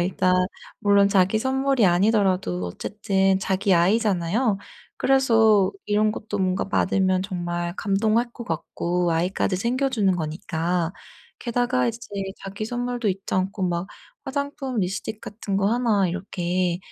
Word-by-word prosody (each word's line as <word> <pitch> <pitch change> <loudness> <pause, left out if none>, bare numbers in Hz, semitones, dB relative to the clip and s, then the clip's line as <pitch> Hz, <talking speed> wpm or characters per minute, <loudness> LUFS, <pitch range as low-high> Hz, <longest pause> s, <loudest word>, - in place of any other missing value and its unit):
일단 185 +1 +1 0.5
물론 200 -1 +4
자기 195 +2 +3
선물이 265 -1 +1
아니더라도 185 - +2
어쨌든 195 - 0
자기 190 0 +1
아이잖아요. 200 +3 +2 0.4
그래서 225 -7 +4
이런 210 +1 +2
것도 210 -1 -5
뭔가 185 +1 0
받으면 185 -2 +1
정말 175 -2 -3
감동할 220 +4 +1
것 235 - -8
같고 175 +1 -2
아이까지 180 +3 0
챙겨주는 235 -4 +1
거니까 165 +1 -2 0.5
게다가 245 +1 0
이제 230 0 -4 0.4
자기 195 +2 -6
선물도 245 -1 -2
잊지 190 0 -3
않고 190 +1 -1
막 175 +2 -2 0.4
화장품 275 -2 -3
립스틱 200 +3 -3
같은 200 -2 -4
거 195 - +2
하나 225 -6 +2
이렇게 180 -1 -1
195 Hz, 300 characters per minute, -24 LUFS, 180-225 Hz, 0.5 s, 물론